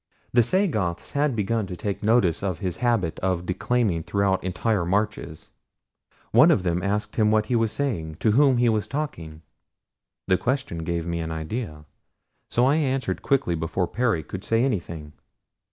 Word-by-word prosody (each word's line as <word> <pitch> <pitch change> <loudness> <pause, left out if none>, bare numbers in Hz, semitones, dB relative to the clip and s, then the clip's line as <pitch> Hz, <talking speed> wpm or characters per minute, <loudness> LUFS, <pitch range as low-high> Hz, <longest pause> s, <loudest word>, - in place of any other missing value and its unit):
The 120 - +6
Sagoths 110 - 0
had 145 -2 +1
begun 110 0 -1
to 90 -2 -6
take 100 +1 -3
notice 105 -6 +2
of 95 -4 -2
his 90 0 -4
habit 115 -10 0
of 90 -2 -1
declaiming 95 -1 0
throughout 100 +2 0
entire 95 +2 0
marches. 100 -3 -2 0.8
One - - +7
of - - +3
them 90 -1 0
asked 105 +2 -2
him 105 -2 +4
what 110 0 +3
he 120 - 0
was 115 -2 +2
saying 100 - -2
to 110 +6 +1
whom 135 +2 +4
he 120 0 +3
was 110 -2 +1
talking. 85 - -5 0.8
The 95 - +3
question 125 -10 -2
gave 85 0 -2
me 85 0 -2
an 80 -1 -3
idea, 80 -1 -5 0.6
so 120 - +2
I 140 +4 +3
answered 135 -4 -1
quickly 135 -10 +1
before 80 +3 -1
Perry 110 -3 0
could 95 +5 -7
say 115 +1 +1
anything. 85 - -4
100 Hz, 170 wpm, -24 LUFS, 85-120 Hz, 0.8 s, One